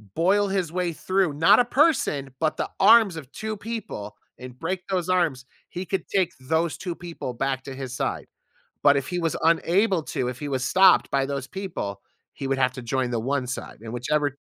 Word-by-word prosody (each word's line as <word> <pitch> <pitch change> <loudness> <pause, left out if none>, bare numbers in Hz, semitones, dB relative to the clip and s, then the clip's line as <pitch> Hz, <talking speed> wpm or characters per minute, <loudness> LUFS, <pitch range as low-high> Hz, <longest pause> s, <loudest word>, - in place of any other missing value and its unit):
boil 200 +5 +3
his 190 -4 -1
way 180 -2 -1
through, 185 -2 0
not 165 +10 +5
a 245 - +4
person, 245 - +2
but 155 -1 0
the - - -2
arms 200 -2 +6
of 140 -4 -9
2 215 -1 -5
people 205 - -6 0.2
and 125 0 -10
break 180 +2 -2
those 185 -2 -1
arms, 160 -8 +1 0.2
he 180 - -5
could 190 -2 -3
take 185 -3 +3
those 160 +5 0
2 175 -2 -4
people 170 -7 -6
back 130 +2 -2
to 135 - -7
his 130 -2 -6
side. - - -3 0.6
But 145 -1 +6
if 135 - -2
he 180 -1 -2
was 165 -2 -1
unable 175 +3 +3
to, 125 - -2
if 125 0 -5
he 145 - -4
was 130 -1 -1
stopped 190 -1 +5
by 135 -1 +2
those 140 -2 -3
people, 130 - -5 0.3
he 135 - -5
would 135 0 0
have 130 -1 +2
to 130 - -7
join 125 +1 -1
the 120 - 0
1 130 +3 -1
side, 125 - -6
and 115 +1 -8
whichever 145 +3 0
160 Hz, 205 wpm, -25 LUFS, 130-185 Hz, 0.6 s, arms